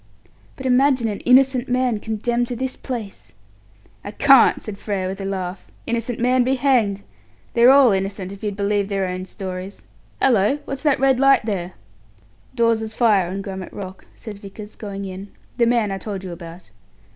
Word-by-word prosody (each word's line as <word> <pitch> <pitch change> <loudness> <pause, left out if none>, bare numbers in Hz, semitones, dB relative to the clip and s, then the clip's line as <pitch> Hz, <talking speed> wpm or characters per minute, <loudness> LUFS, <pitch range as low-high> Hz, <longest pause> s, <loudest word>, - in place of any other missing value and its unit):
"But 265 - -9
imagine 260 -1 +3
an 205 - -4
innocent 260 0 +3
man 250 -3 +1
condemned 235 +3 -1
to 245 - -4
this 260 +2 -3
place!" 230 -7 -7 0.7
"I - - -6
can't," 270 +4 +5
said 200 -2 -7
Frere, 195 -3 -2
with 190 +1 -5
a - - -4
laugh. 190 -1 -4 0.2
"Innocent 235 0 -2
man 250 +1 +3
be 260 +2 +1
hanged! 235 -7 +1 0.5
They're 235 +1 +6
all 270 -3 +7
innocent, 195 -1 -2
if 200 - -10
you'd 210 -2 -3
believe 200 0 0
their 195 -1 -1
own 185 0 -4
stories. 190 0 -7 0.4
Hallo! 235 0 +3
what's 275 0 -5
that 295 -2 +2
red 265 -1 +3
light 275 -4 +4
there?" 185 -4 -3 0.8
"Dawes's 225 -2 +1
fire, 205 -7 +3
on 195 +2 -4
Grummet 190 -2 -7
Rock," 190 -2 -9
says 210 -4 -9
Vickers, 205 +1 -10
going 200 -2 -6
in; 190 +1 -7 0.3
"the 235 -2 +3
man 230 -4 +1
I 195 - -3
told 195 -1 -6
you 185 - -6
about. 170 - -11
210 Hz, 175 wpm, -21 LUFS, 195-250 Hz, 0.8 s, all